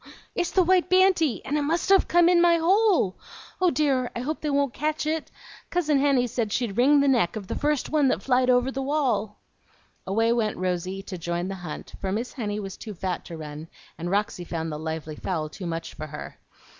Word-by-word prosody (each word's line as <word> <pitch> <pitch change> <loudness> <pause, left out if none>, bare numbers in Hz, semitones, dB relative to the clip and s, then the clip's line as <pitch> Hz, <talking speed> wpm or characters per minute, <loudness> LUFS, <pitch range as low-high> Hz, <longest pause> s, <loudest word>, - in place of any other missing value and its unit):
"It's 350 -1 -1
the 370 - +3
white 365 0 +3
banty, 370 -7 +3
and 295 +3 0
it - - 0
must 325 +6 0
have 390 -1 +5
come 345 0 +5
in 350 -1 +5
my 345 -1 +5
hole! 365 - +3 0.4
Oh 365 - +5
dear, 270 -4 +1
I 235 - -3
hope 305 +5 -3
they 300 - -1
won't 280 -2 +1
catch 305 +2 -2
it! 315 +1 -2 0.4
Cousin 310 -5 +1
Henny 275 -3 +3
said 230 -3 -2
she'd 230 -3 -1
wring 280 +5 +5
the 280 - +2
neck 235 -10 +2
of 210 -3 -5
the - - -4
first 295 -2 -1
one 300 -3 +3
that - - 0
flied 255 -1 +2
over 250 +1 +3
the 270 - -3
wall." 265 -7 0 0.7
Away 225 +4 +2
went 220 -3 0
Rosy, 185 +1 -2
to 185 -3 -7
join 170 +1 -2
in 180 - -3
the - - -3
hunt; 160 -4 -7
for 190 - -2
Miss 230 +5 -3
Henny 210 -5 -3
was 195 -2 -6
too 215 -3 -8
fat 180 0 -3
to 165 - -8
run, 150 0 -8 0.3
and 170 +1 -5
Roxy 200 -2 -1
found 165 -2 -4
the 150 - -5
lively 160 -1 -5
fowl 160 -5 -3
too 180 +3 -7
much 165 0 -4
for 155 - -7
her. 150 0 -9
245 Hz, 220 wpm, -25 LUFS, 185-300 Hz, 0.7 s, have